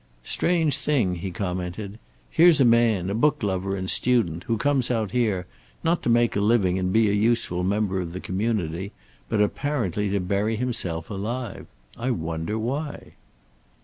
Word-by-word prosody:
"Strange 165 - +1
thing," 115 -12 +1
he 95 +3 -4
commented. 95 +3 -4 0.3
"Here's 165 -2 +6
a 135 - +5
man, 115 -6 +3
a - - -1
book 145 +4 +1
lover 95 -1 -1
and 95 -1 -4
student, 95 -9 +2
who 115 - 0
comes 135 0 +1
out 110 -5 -1
here, 110 -7 0 0.4
not 165 +1 +1
to - - -1
make 120 0 +3
living 100 -3 +2
and 90 0 -1
be 110 +2 +4
a 100 - +1
useful 105 -4 +1
member 100 0 0
of 85 -2 -5
the 90 - -6
community, 95 -2 -2 0.4
but 105 - +1
apparently 105 - -1
to 100 +1 0
bury 100 +4 0
himself 95 -9 -3
alive. 110 +3 -4 0.3
I 125 +3 -1
wonder, 80 -1 -2
why." 140 +7 -4
105 Hz, 160 wpm, -24 LUFS, 95-120 Hz, 0.4 s, Here's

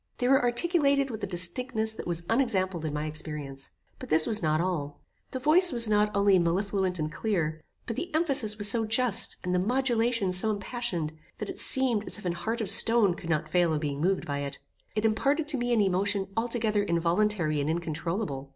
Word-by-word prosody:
They 245 - -1
were 270 +1 +4
articulated 280 +2 +1
with 220 - -7
a - - -1
distinctness 220 +6 +1
that 220 - -8
was 170 -1 -1
unexampled 190 - -1
in 155 - -3
my 150 +1 -3
experience. 150 -3 -6 0.3
But - - -9
this 155 0 +4
was 220 -1 +3
not 155 -1 0
all. 160 -5 -3 0.3
The - - -5
voice 320 +7 +3
was 235 -2 +6
not 210 0 +2
only 200 -2 +3
mellifluent 185 +2 -1
and 155 -1 -3
clear, 160 -5 -2 0.2
but 230 - -5
the 345 +7 -5
emphasis 275 -10 +2
was 205 -1 +3
so 225 +2 +2
just, 225 -1 +3
and 180 - -2
the 180 - +1
modulation 235 -2 0
so 185 +4 +1
impassioned, 200 -6 -3 0.3
that - - -5
it - - -11
seemed 250 -6 +3
as - - 0
if 205 - -12
an 175 - 0
heart 225 +7 -4
of 210 - -2
stone 220 -2 +4
could 170 - -10
not 155 -1 -2
fail 175 -2 +2
of 150 - -3
being 145 -2 -4
moved 190 +3 0
by 140 -1 -4
it. 140 0 -4 0.4
It 215 +1 -1
imparted 280 +8 0
to 290 - +2
me 245 0 -2
an 230 -3 +3
emotion 195 +1 0
altogether 225 -2 0
involuntary 170 -3 0
and 145 - -2
incontroulable. 165 -3 -4
200 Hz, 205 wpm, -27 LUFS, 170-235 Hz, 0.4 s, was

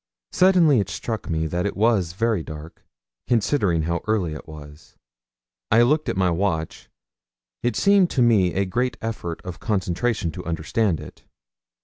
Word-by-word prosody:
Suddenly 175 -8 +4
it 100 -2 -2
struck 110 +2 -5
me 80 -1 0
that 90 +4 -1
it 100 - -5
was 100 -6 +2
very 110 -1 0
dark, 80 0 -10 0.4
considering 105 - +1
how 85 +1 -1
early 100 -7 0
it 75 - -9
was. 75 -1 -13 0.7
I 115 +3 +5
looked 150 +5 +1
at - - -2
my 90 -2 +2
watch; 85 -3 -2 0.7
it 120 -3 -1
seemed 200 - +4
to 125 - +2
me 100 -7 +3
a 95 +1 +1
great 125 +7 -1
effort 105 -7 -5
of 90 -1 -7
concentration 95 -2 -1
to 90 +3 -8
understand 85 +3 -1
it. - - -12
95 Hz, 155 wpm, -23 LUFS, 85-115 Hz, 0.7 s, I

